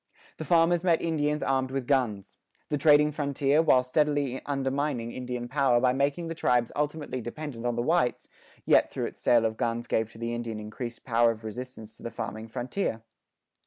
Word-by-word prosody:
The 160 Hz, -, -5 dB
farmers 170 Hz, +1 st, +3 dB
met 170 Hz, -3 st, +3 dB
Indians 150 Hz, -2 st, 0 dB
armed 130 Hz, -1 st, +1 dB
with 135 Hz, -1 st, -3 dB
guns. 120 Hz, -8 st, 0 dB, 0.3 s
The 150 Hz, -, 0 dB
trading 150 Hz, 0 st, +5 dB
frontier, 140 Hz, 0 st, +1 dB
while 130 Hz, -6 st, +4 dB
steadily 145 Hz, -1 st, 0 dB
undermining 135 Hz, -3 st, -1 dB
Indian 125 Hz, -1 st, -5 dB
power 130 Hz, -2 st, +3 dB
by 125 Hz, 0 st, +3 dB
making 140 Hz, +5 st, 0 dB
the 165 Hz, -, -3 dB
tribes 125 Hz, -7 st, +1 dB
ultimately 150 Hz, -3 st, -2 dB
dependent 120 Hz, -1 st, -5 dB
on 120 Hz, -, 0 dB
the 120 Hz, -, -1 dB
whites, 160 Hz, -3 st, +1 dB, 0.4 s
yet, -, -, +4 dB
through -, -, -3 dB
its -, -, -8 dB
sale 120 Hz, -2 st, +4 dB
of 110 Hz, 0 st, -1 dB
guns, 120 Hz, -1 st, -1 dB
gave 110 Hz, -1 st, -1 dB
to -, -, -13 dB
the 115 Hz, +1 st, -3 dB
Indian 115 Hz, -2 st, -4 dB
increased 115 Hz, +3 st, -7 dB
power 120 Hz, -1 st, +4 dB
of 115 Hz, -1 st, -4 dB
resistance 110 Hz, 0 st, -7 dB
to -, -, -18 dB
the 115 Hz, -, -5 dB
farming 110 Hz, -1 st, -6 dB
frontier. 120 Hz, -, -3 dB
130 Hz, 185 wpm, -28 LUFS, 120-145 Hz, 0.4 s, trading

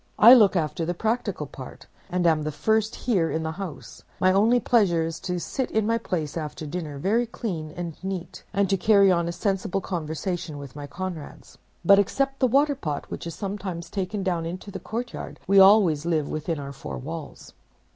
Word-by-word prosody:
I 235 Hz, +4 st, +10 dB
look 210 Hz, -6 st, +6 dB
after 155 Hz, -1 st, -1 dB
the 175 Hz, +2 st, -2 dB
practical 225 Hz, +6 st, -1 dB
part, -, -, -10 dB, 0.2 s
and 180 Hz, -1 st, 0 dB
am 160 Hz, -2 st, +4 dB
the 155 Hz, 0 st, -2 dB
first 220 Hz, +9 st, +1 dB
here 190 Hz, -10 st, +1 dB
in 160 Hz, -, -2 dB
the 160 Hz, -, -2 dB
house. 180 Hz, -2 st, -8 dB, 0.2 s
My 185 Hz, -, +4 dB
only 225 Hz, +5 st, +4 dB
pleasure 195 Hz, -10 st, +3 dB
is 165 Hz, 0 st, -4 dB
to 180 Hz, -1 st, -3 dB
sit 260 Hz, +8 st, -3 dB
in 220 Hz, -1 st, +1 dB
my 230 Hz, +1 st, +1 dB
place 160 Hz, -9 st, -3 dB
after 155 Hz, -1 st, -5 dB
dinner, 150 Hz, -2 st, -5 dB
very 220 Hz, +10 st, +1 dB
clean 175 Hz, -9 st, -4 dB
and 170 Hz, -3 st, -4 dB
neat, 190 Hz, -2 st, -5 dB
and 200 Hz, -1 st, +1 dB
to 195 Hz, -, +3 dB
carry 200 Hz, -1 st, +5 dB
on 170 Hz, -1 st, +1 dB
a -, -, -1 dB
sensible 190 Hz, +1 st, -1 dB
conversation 170 Hz, -2 st, -4 dB
with 140 Hz, -2 st, -9 dB
my 145 Hz, -1 st, -7 dB
comrades. 175 Hz, -1 st, -7 dB, 0.3 s
But 200 Hz, +3 st, +7 dB
except 270 Hz, +7 st, 0 dB
the 255 Hz, -, +3 dB
Waterpot, 275 Hz, -, 0 dB
which -, -, -5 dB
is 165 Hz, -, -6 dB
sometimes 190 Hz, -4 st, -5 dB
taken 195 Hz, 0 st, -3 dB
down 175 Hz, -3 st, 0 dB
into 185 Hz, +4 st, -7 dB
the 190 Hz, -, -6 dB
courtyard, 235 Hz, +3 st, -6 dB
we 195 Hz, +1 st, +5 dB
always 190 Hz, -6 st, +6 dB
live 160 Hz, -4 st, 0 dB
within 155 Hz, +1 st, -3 dB
our 140 Hz, -1 st, -6 dB
four 135 Hz, -, -7 dB
walls. 155 Hz, +3 st, -8 dB
180 Hz, 195 wpm, -25 LUFS, 160-205 Hz, 0.3 s, I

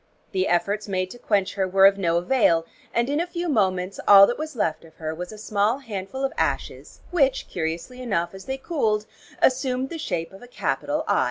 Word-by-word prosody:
The 190 Hz, -1 st, 0 dB
efforts 200 Hz, +5 st, 0 dB
made 185 Hz, -1 st, -2 dB
to 245 Hz, -, -11 dB
quench 200 Hz, -5 st, 0 dB
her 190 Hz, -2 st, 0 dB
were 195 Hz, +1 st, +5 dB
of 195 Hz, 0 st, +5 dB
no 170 Hz, -3 st, +2 dB
avail 175 Hz, -4 st, +3 dB, 0.3 s
and 235 Hz, +1 st, +1 dB
in 290 Hz, +2 st, 0 dB
a 345 Hz, -, -1 dB
few 350 Hz, 0 st, -4 dB
moments 190 Hz, -, 0 dB
all 200 Hz, -1 st, +10 dB
that 240 Hz, -, -2 dB
was 310 Hz, -2 st, -5 dB
left 160 Hz, -8 st, -1 dB
of 160 Hz, -1 st, -17 dB
her 155 Hz, -1 st, -4 dB
was 180 Hz, +2 st, -6 dB
a 215 Hz, -, -10 dB
small 210 Hz, +2 st, 0 dB
handful 230 Hz, 0 st, -6 dB
of 270 Hz, -, 0 dB
ashes, -, -, -3 dB
which 275 Hz, -7 st, +2 dB
curiously 170 Hz, +10 st, -4 dB
enough, 175 Hz, -8 st, -1 dB
as 190 Hz, 0 st, -10 dB
they 265 Hz, 0 st, -3 dB
cooled, 225 Hz, -9 st, 0 dB, 0.4 s
assumed 260 Hz, 0 st, +2 dB
the 330 Hz, -, -5 dB
shape 165 Hz, -, -3 dB
of 195 Hz, -, -13 dB
a 245 Hz, -, -12 dB
capital 295 Hz, +4 st, -2 dB
'I.' -, -, +3 dB
205 Hz, 210 wpm, -24 LUFS, 185-265 Hz, 0.4 s, all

